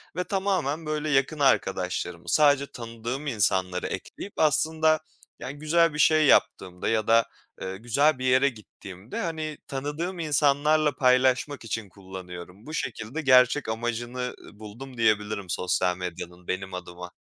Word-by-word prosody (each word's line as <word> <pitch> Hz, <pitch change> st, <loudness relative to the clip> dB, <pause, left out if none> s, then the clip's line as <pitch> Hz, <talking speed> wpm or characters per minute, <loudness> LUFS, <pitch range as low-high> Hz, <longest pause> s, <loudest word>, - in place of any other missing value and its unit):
ve 180 Hz, -, -1 dB
tamamen 185 Hz, -6 st, -1 dB
böyle 155 Hz, 0 st, -2 dB
yakın 140 Hz, +2 st, +1 dB
arkadaşlarımı, 90 Hz, -9 st, 0 dB
sadece 145 Hz, -, +4 dB
tanıdığım 120 Hz, +4 st, -6 dB
insanları 95 Hz, -7 st, 0 dB
ekleyip 200 Hz, -, -7 dB
aslında 155 Hz, +1 st, +3 dB, 0.4 s
yani 140 Hz, +2 st, -7 dB
güzel 165 Hz, +1 st, +3 dB
bir 150 Hz, -, -5 dB
şey 155 Hz, -1 st, +5 dB
yaptığımda 90 Hz, -9 st, +2 dB
ya 110 Hz, -1 st, 0 dB
da, 115 Hz, 0 st, +5 dB, 0.4 s
ııı, 95 Hz, 0 st, -4 dB
güzel 130 Hz, +6 st, +2 dB
bir 130 Hz, -, -3 dB
yere 130 Hz, +2 st, +4 dB
gittiğimde, 100 Hz, -3 st, -10 dB
hani, 155 Hz, -2 st, -4 dB
tanıdığım 150 Hz, +7 st, -4 dB
insanlarla 150 Hz, -1 st, +2 dB
paylaşmak 130 Hz, +1 st, +2 dB
için 110 Hz, -2 st, -4 dB
kullanıyorum. 95 Hz, +1 st, -10 dB
Bu 155 Hz, -, -8 dB
şekilde 130 Hz, 0 st, -4 dB
gerçek 130 Hz, -1 st, +4 dB
amacını, 120 Hz, +2 st, -3 dB, 0.2 s
ııı, 105 Hz, -, -16 dB
buldum 120 Hz, +5 st, -10 dB
diyebilirim 105 Hz, -4 st, +1 dB
sosyal 90 Hz, 0 st, 0 dB
medyanın 90 Hz, 0 st, -7 dB
benim 95 Hz, +1 st, -3 dB
adıma. 90 Hz, 0 st, -8 dB
125 Hz, 135 wpm, -26 LUFS, 95-150 Hz, 0.4 s, şey